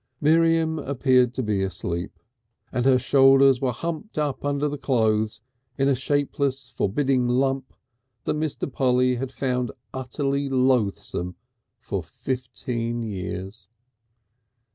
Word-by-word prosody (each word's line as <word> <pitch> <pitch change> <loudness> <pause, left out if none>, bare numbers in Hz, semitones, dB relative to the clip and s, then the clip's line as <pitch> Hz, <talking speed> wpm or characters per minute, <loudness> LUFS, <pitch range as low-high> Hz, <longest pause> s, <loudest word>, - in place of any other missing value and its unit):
Miriam 160 +1 +3
appeared 130 -3 +2
to 130 - -1
be 105 -3 0
asleep, 85 -2 -3 0.5
and 125 +1 0
her 130 -1 +6
shoulders 135 0 +5
were 130 -2 +1
humped 170 - -5
up 150 -3 -1
under 145 +1 0
the 145 -1 -4
clothes 110 -5 +1 0.4
in 135 - +2
a 140 - +4
shapeless, 140 -1 -1
forbidding 130 +4 +1
lump 135 +1 0 0.5
that - - 0
Mr. 155 -1 -2
Polly 125 -1 +2
had 130 +1 -4
found 125 -3 -1 0.2
utterly 135 +2 -2
loathsome 120 -9 0 0.4
for - - -4
fifteen 120 -2 -4
years. 95 0 -6
130 Hz, 120 wpm, -24 LUFS, 120-140 Hz, 0.5 s, her